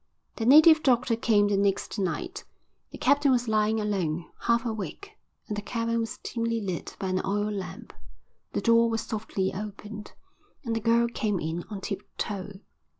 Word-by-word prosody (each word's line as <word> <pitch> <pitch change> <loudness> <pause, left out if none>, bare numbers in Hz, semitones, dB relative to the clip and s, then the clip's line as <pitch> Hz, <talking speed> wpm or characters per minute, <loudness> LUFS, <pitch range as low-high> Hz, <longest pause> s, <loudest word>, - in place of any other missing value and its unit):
The 225 - -1
native 310 +3 +8
doctor 245 -4 +3
came 215 -3 +3
the 205 -1 +1
next 200 +1 0
night. 345 - -3 0.5
The - - -10
captain 285 0 +3
was 245 -1 +2
lying 215 0 +2
alone, 180 -6 -1
half 235 +1 +1
awake, 225 - -5 0.4
and 210 - -3
the 210 - -3
cabin 230 +1 -1
was 225 -1 -3
dimly 230 -1 -1
lit 185 -5 -4
by 190 - -3
an 185 0 0
oil 205 +2 0
lamp. 190 -5 -6 0.6
The - - -1
door 230 +2 +4
was 225 -1 -1
softly 215 -4 -2
opened 210 +1 -7 0.5
and 230 -1 -1
the - - 0
girl 235 +1 +3
came 215 -4 -1
in 165 +2 -3
on 205 -3 -6
tip 195 -1 -4 0.2
toe. 200 -1 -4
215 Hz, 170 wpm, -27 LUFS, 200-230 Hz, 0.6 s, native